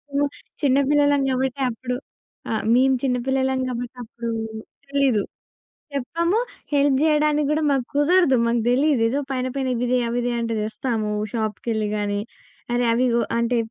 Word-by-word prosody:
హ్మ్. 285 0 +3 0.3
చిన్నపిల్లలం 285 +1 +3
కాబట్టి 260 +1 -1
అప్పుడు 250 +1 -4 0.6
ఆహ్, 220 - -1
మేము 260 +1 +4
చిన్నపిల్లలం 265 +1 0
కాబట్టి 245 0 -4
అప్పుడు 235 +1 -6 0.6
తెలీదు. 275 -6 +2 0.7
చెప్పాము 335 - 0 0.4
హెల్ప్ 280 -1 +4
చేయడానికి 300 -1 +3
కూడా 310 - +1
మాకు 270 -3 +1
కుదరదు. 305 -1 +4
మాకు 235 0 +1
తెలీదు 270 0 +3
ఏదో 270 +5 0
పైన 255 -1 -1
పైన 270 -1 -1
ఇవి 240 +1 -1
తే, 255 - +4
అవి 240 - -1
తే 245 - 0
అంటే 230 -1 -2
తెస్తాము. 215 0 -2 0.2
షాప్‌కెళ్ళి 220 -1 -2
కానీ, 205 -1 -1 0.5
అరే 245 0 +2
అవిగొ 235 -1 +2 0.2
అంటే 235 +1 +1
255 Hz, 140 wpm, -23 LUFS, 235-280 Hz, 0.7 s, మేము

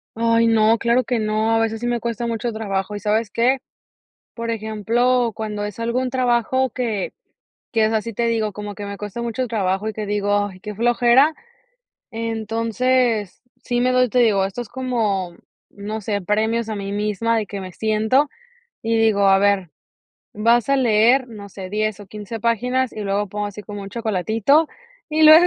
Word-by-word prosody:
Ay 230 0 +3
no, 225 0 +4
claro 235 +2 +2
que 235 0 0
no, 215 +1 +1
a - - +3
veces 225 0 -1
sí 240 - -3
me 240 -1 -1
cuesta 235 0 -2
mucho 235 +1 -2
trabajo, 205 -2 -3
¿y - - -6
sabes 215 +2 0
qué?, 255 +5 +2 0.8
por 230 0 -3
ejemplo, 230 +3 +1
cuando 215 -1 -4
es 210 +2 -7
algún 240 +3 -1
trabajo 255 +1 +1
que 225 -5 -3 0.6
que 225 -3 +3
es 215 - +1
así 225 +1 -2
te 235 +3 0
digo, 220 -2 0
como 205 0 -6
que 205 0 -7
me 200 0 -6
cuesta 210 +3 -6
mucho 235 +2 -2
trabajo 195 -2 -1
y 220 - -1
que 215 -1 -5
digo: 205 0 +1
"Ay, 185 -2 -11
qué 210 +1 -6
flojera". 240 +6 +4 0.8
Entonces, 225 0 0 0.2
sí 245 -1 -1
me 250 +1 +2
doy 255 -1 +3
te 250 - +2
digo, 210 -5 +4
esto 195 +4 -4
es 240 - -7
como, 220 -8 -1 0.4
no 210 +2 -6
sé, 205 0 -1
premios 220 +4 0
a 220 - -3
mí 200 -1 -5
misma, 210 +2 0
de 215 - -1
que 200 0 -6
me 185 -1 -7
siento 220 - +2 0.5
y 230 0 0
digo: 220 -3 +3
"A 195 0 +6
ver, 200 -4 +2 0.6
vas 230 +3 +2
a 275 - +4
leer", 245 +1 +4
no 210 -4 -10
sé, 190 -1 -8
10 215 0 -1
o 205 - -11
15 210 +3 -7
páginas 245 +3 0
y 215 - -7
luego 200 0 -1
pongo 205 +1 -3
así 205 +1 -8
como 205 -1 -7
un 195 - -7
chocolatito 225 - +1 0.4
y 310 0 +1
luego 315 +3 +9
220 Hz, 190 wpm, -21 LUFS, 205-235 Hz, 0.8 s, luego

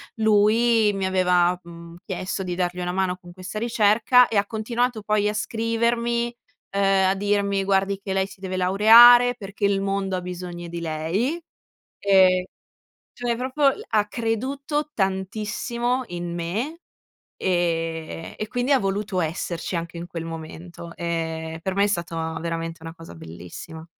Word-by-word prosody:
lui 220 0 +3
mi 195 -1 -1
aveva, 180 -1 +2
mhmm, 170 0 -12
chiesto 185 0 -4
di 180 -2 -3
dargli 180 0 -2
una 180 0 -2
mano 185 -1 -1
con 175 -1 -14
questa 185 +3 -6
ricerca, 235 +2 +4
e 215 - 0
ha 200 0 +2
continuato 230 0 -2
poi 210 -1 +1
a - - -2
scrivermi, 235 +2 -1 0.4
uhm, 200 - +1 0.3
a 195 - +1
dirmi: 200 -1 0
"Guardi 195 0 +1
che 195 - -3
lei 190 0 +1
si 195 - -15
deve 185 -1 -4
laureare, 230 +6 +7
perché 200 -1 -9
il 200 -1 +2
mondo 195 -1 -1
ha - - -4
bisogno 175 -1 -7
di 170 0 -6
lei." 170 - -2 0.6
Ehm, 185 -2 +4 0.7
cioè 240 -1 -1
proprio 260 +4 -4 0.3
ha 210 -2 +2
creduto 270 +7 -2
tantissimo 215 +6 -1
in 175 -1 -5
me, 220 - -3 0.6
ehm, 165 -3 -2
e 215 - -4
quindi 245 +3 -1
ha 265 - +4
voluto 195 -1 -2
esserci 165 +2 -3
anche 170 0 -4
in 170 - -5
quel 165 -1 -6
momento. 165 +1 -8
Ehm, 160 -1 -3
per 190 +2 -2
me 200 - +3
è - - +1
stata 165 -3 -3
veramente 165 0 -4
una 165 0 -7
cosa 165 - -12
bellissima. 85 - -10
195 Hz, 155 wpm, -23 LUFS, 170-220 Hz, 0.7 s, laureare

